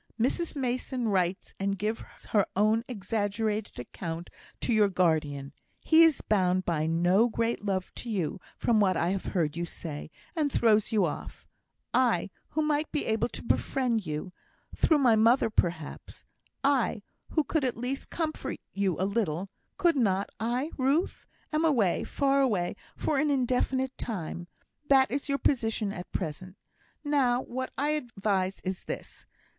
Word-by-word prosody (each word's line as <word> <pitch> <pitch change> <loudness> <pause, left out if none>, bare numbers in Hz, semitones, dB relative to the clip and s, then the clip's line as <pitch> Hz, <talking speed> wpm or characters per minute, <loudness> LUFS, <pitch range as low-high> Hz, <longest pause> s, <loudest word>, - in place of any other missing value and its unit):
Mrs 310 +8 0
Mason 250 -2 -1
writes 185 -2 0
and 195 0 0
gives 215 +4 -4
her 205 -3 +3
own 215 +3 +3
exaggerated 210 -1 -2
account 165 +7 -6 0.3
to 240 - +1
your 210 -2 +4
guardian; 155 -6 0 0.3
he 320 0 +5
is 325 -4 +5
bound 185 -3 +2
by 155 -2 0
no 175 +8 +3
great 230 0 -1
love 190 -2 -2
to 240 - -7
you, 190 -3 -2 0.2
from 230 -2 +2
what 190 -4 +3
I 170 +1 +1
have 195 0 -2
heard 155 -5 0
you 170 - -2
say, 155 -3 -6 0.3
and 300 -4 +1
throws 220 -4 +3
you 215 -3 +3
off; - - -6 0.5
I, 230 -8 +2 0.2
who 310 - 0
might 300 0 0
be 300 - -1
able 220 0 +1
to - - -8
befriend 240 -2 +1
you 155 +5 -4 0.4
through 315 - +4
my 250 -6 +5
mother, 225 +1 +4
perhaps 170 -7 -2 0.4
I, 265 -6 +2 0.3
who 310 - +2
could 300 +1 0
at 255 -4 -1
least 250 +3 -3
comfort 320 -2 -3
you 195 -4 0
a 190 - +2
little 195 -3 -1 0.3
(could 345 -4 +3
not 200 -5 +1
I, 245 +7 -1
Ruth?), 275 +7 +1 0.3
am 305 +1 +2
away, 235 - +2
far 275 -1 +2
away, 200 -8 +1 0.2
for 295 -3 0
an 300 +1 +2
indefinite 260 0 +1
time; 175 -5 -4 0.4
that 265 -2 +5
is 280 +2 -2
your 280 - +2
position 225 -7 +1
at 180 - -8
present. 185 +3 -4 0.5
Now, 265 -4 +2
what 260 +1 -4
I 290 +2 +1
advise 200 -9 -1
is 185 0 -4
this. - - -7
220 Hz, 155 wpm, -29 LUFS, 185-265 Hz, 0.5 s, he